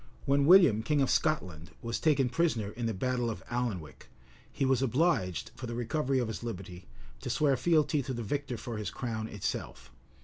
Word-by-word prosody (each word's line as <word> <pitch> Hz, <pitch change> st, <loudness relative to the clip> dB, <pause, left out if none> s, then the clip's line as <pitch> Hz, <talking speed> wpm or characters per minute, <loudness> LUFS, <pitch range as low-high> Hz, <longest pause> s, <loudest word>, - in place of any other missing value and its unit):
When 140 Hz, 0 st, +3 dB
William, 170 Hz, -, +7 dB
king 145 Hz, +6 st, +1 dB
of 135 Hz, -, +2 dB
Scotland, 90 Hz, -, 0 dB
was 115 Hz, 0 st, -2 dB
taken 140 Hz, -5 st, +3 dB
prisoner 125 Hz, -7 st, 0 dB
in 120 Hz, +1 st, -3 dB
the 115 Hz, -, -1 dB
battle 125 Hz, +3 st, -1 dB
of 110 Hz, -, -6 dB
Alnwick, 105 Hz, -, -4 dB, 0.4 s
he 135 Hz, -, -1 dB
was 130 Hz, -1 st, +2 dB
obliged, 125 Hz, -, +1 dB
for 125 Hz, -, -7 dB
the 115 Hz, -, -4 dB
recovery 130 Hz, +3 st, 0 dB
of 125 Hz, -3 st, 0 dB
his 110 Hz, -, -5 dB
liberty, 95 Hz, -6 st, -7 dB, 0.3 s
to -, -, -6 dB
swear 135 Hz, +3 st, +2 dB
fealty 155 Hz, 0 st, +2 dB
to 130 Hz, 0 st, -4 dB
the 120 Hz, -, -4 dB
victor 130 Hz, +2 st, -3 dB
for 115 Hz, 0 st, -6 dB
his 105 Hz, -, -3 dB
crown 110 Hz, -3 st, -4 dB
itself. 105 Hz, -4 st, -5 dB
120 Hz, 190 wpm, -30 LUFS, 110-140 Hz, 0.4 s, William